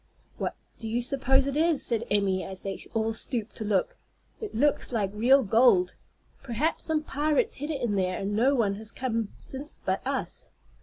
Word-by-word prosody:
"What - - -2 0.2
do 225 - -5
you 230 +2 0
suppose 265 +1 +2
it 280 0 -2
is?" 320 -1 +2
said 235 0 -1
Emmy, 195 -2 +1
as 190 -1 -5
they 195 -1 -5
all 225 0 +1
stooped 225 0 -3
to - - -3
look. 205 -3 0 0.4
"It 435 - -6
looks 285 +4 +2
like 205 -5 0
real 255 +6 +5
gold. 215 -4 +4 0.5
Perhaps 275 +5 +1
some 315 -1 0
pirates 295 0 +1
hid 295 +3 -5
it 270 -6 -1
there, 190 -3 0
and 200 +1 -2
no 260 +6 +4
one 215 -6 +2
has 220 +1 -4
come 230 -5 -2
since 280 +3 -6
but - - 0
us." - - -3
235 Hz, 185 wpm, -28 LUFS, 205-275 Hz, 0.5 s, real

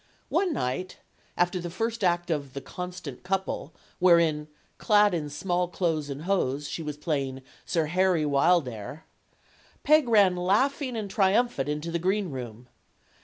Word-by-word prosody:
One 375 -3 +1
night, 185 - -3 0.4
after 175 +1 +1
the 175 0 -5
first 225 +4 -3
act 175 -1 +1
of 140 -4 -2
"The 140 - -4
Constant 180 -3 -7
Couple," 190 -4 -2 0.3
wherein, 170 -4 +4 0.3
clad 210 -2 +4
in 155 -4 -2
small 175 +4 -1
clothes 165 -5 -1
and 140 +2 -6
hose, 145 -7 0
she - - -5
was 150 -2 -5
playing 135 -4 -2 0.2
Sir 165 -2 +1
Harry 180 -1 +2
Wildair, 140 - +1 0.8
Peg 305 -4 +4
ran 200 -5 +5
laughing 245 +8 +1
and 215 -2 -3
triumphant 195 - +1
into 150 +3 -3
the 170 - -1
greenroom. 135 - -3
175 Hz, 140 wpm, -27 LUFS, 145-195 Hz, 0.8 s, ran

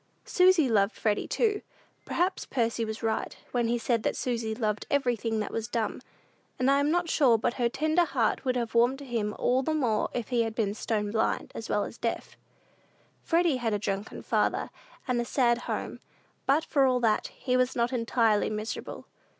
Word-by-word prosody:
Susy 365 -5 +4
loved 205 -2 +2
Freddy, 210 -2 0
too. 425 -3 +1 0.4
Perhaps 365 +2 -1
Percy 230 -2 0
was 220 +1 -5
right, 225 -1 -2
when 240 -2 +1
he 240 +1 +1
said 230 -1 0
that - - -1
Susy 230 -3 -2
loved 215 -3 -2
everything 240 -5 0
that 210 - -3
was 225 -1 -3
dumb; 225 0 -2 0.6
and 260 +2 +2
I 280 - +4
am 285 +1 +2
not 350 +2 +1
sure 265 -8 +4
but 230 - 0
her 235 - +3
tender 315 +6 +2
heart 250 -7 0
would 255 -2 0
have 235 -2 -2
warmed 240 +3 +3
to 280 - -10
him 225 -4 -2
all 255 +2 +2
the 310 +4 -1
more 235 -8 +1
if 240 -3 -3
he 245 -2 +2
had 225 -1 -2
been 210 -4 0
stone 210 -1 -2
blind, 220 0 0
as 225 - -7
well 205 - +1
as - - -8
deaf. 230 - -3 0.9
Freddy 335 -4 +2
had 230 -4 -1
a - - +1
drunken 200 0 -4
father, - - 0 0.4
and 245 -2 +1
a - - -1
sad 240 -1 +2
home; - - -3 0.5
but, 295 +4 +3
for 280 -3 +2
all 255 -1 +2
that, 220 -2 +2
he 250 -2 -2
was 255 0 +2
not 235 +1 0
entirely 230 -3 +2
miserable. 215 +1 -5
235 Hz, 195 wpm, -28 LUFS, 220-265 Hz, 0.9 s, Susy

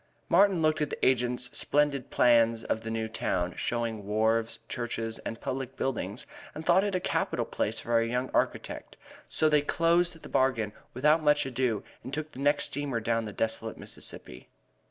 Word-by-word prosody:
Martin 190 -1 +4
looked 155 0 +2
at 150 - 0
the - - -2
agent's 125 -1 +1
splendid 145 -3 +1
plans 115 -1 +4
of 110 - -1
the 115 - -5
new 115 0 -2
town, 90 -5 -1
showing 115 -3 -2
wharves, 110 +2 +1
churches 115 -1 -3
and 115 - -6
public 130 0 -4
buildings, 115 -4 -3 0.3
and 155 +1 -7
thought 180 +3 +5
it 200 -2 -1
a - - +2
capital - - -1
place - - -2
for 115 0 +2
a 115 - 0
young 125 +2 -2
architect; - - -2 0.3
so 155 - +2
they 150 -1 +4
closed 165 +2 +1
the - - -8
bargain 115 -5 +1 0.2
without 150 +5 +4
more 150 -1 +5
ado 125 -4 -1 0.2
and 130 +4 -5
took 155 0 -4
the - - -11
next 145 +1 +2
steamer 140 -4 -2
down 115 0 0
the 105 - -5
desolate 110 +1 -3
Mississippi. - - -9
125 Hz, 175 wpm, -29 LUFS, 115-150 Hz, 0.3 s, thought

